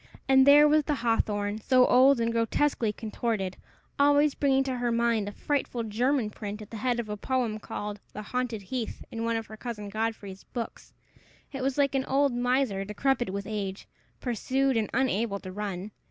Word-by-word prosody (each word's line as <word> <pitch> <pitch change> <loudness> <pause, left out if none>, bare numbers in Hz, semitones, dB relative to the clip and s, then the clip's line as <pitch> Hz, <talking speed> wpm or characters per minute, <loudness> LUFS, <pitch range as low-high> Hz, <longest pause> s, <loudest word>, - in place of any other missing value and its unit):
And 265 0 +6
there 295 +1 +8
was 300 0 +3
the 295 - 0
hawthorn, 215 -4 0
so 255 +3 +4
old 260 +1 +5
and 230 0 +1
grotesquely 230 0 +1
contorted, 210 -3 -3 0.4
always 290 +1 +4
bringing 270 -1 +2
to 260 -2 -3
her 240 -1 0
mind 230 -3 +1
a - - -7
frightful 255 -1 -2
German 230 +2 0
print 210 0 -6
at 215 0 -11
the 225 - -6
head 240 +2 0
of 235 - -3
a 210 - -3
poem 235 -1 -1
called 210 0 -5
"The 210 - -7
Haunted 245 -2 -3
Heath," 235 +4 -5
in 230 0 -4
one 230 0 0
of 225 0 -2
her 220 - -11
cousin 215 -4 -6
Godfrey's 215 -2 -4
books! 235 -2 -7 0.6
It 270 -2 -5
was 270 +1 -1
like 280 -1 +2
an 265 -1 0
old 275 0 +2
miser, 245 -4 +1
decrepit 240 +3 0
with 200 +1 -4
age, 200 -2 -4 0.3
pursued 260 +2 0
and 220 -2 0
unable 230 -5 0
to 185 - -8
run! 200 0 -5
230 Hz, 185 wpm, -28 LUFS, 210-265 Hz, 0.6 s, there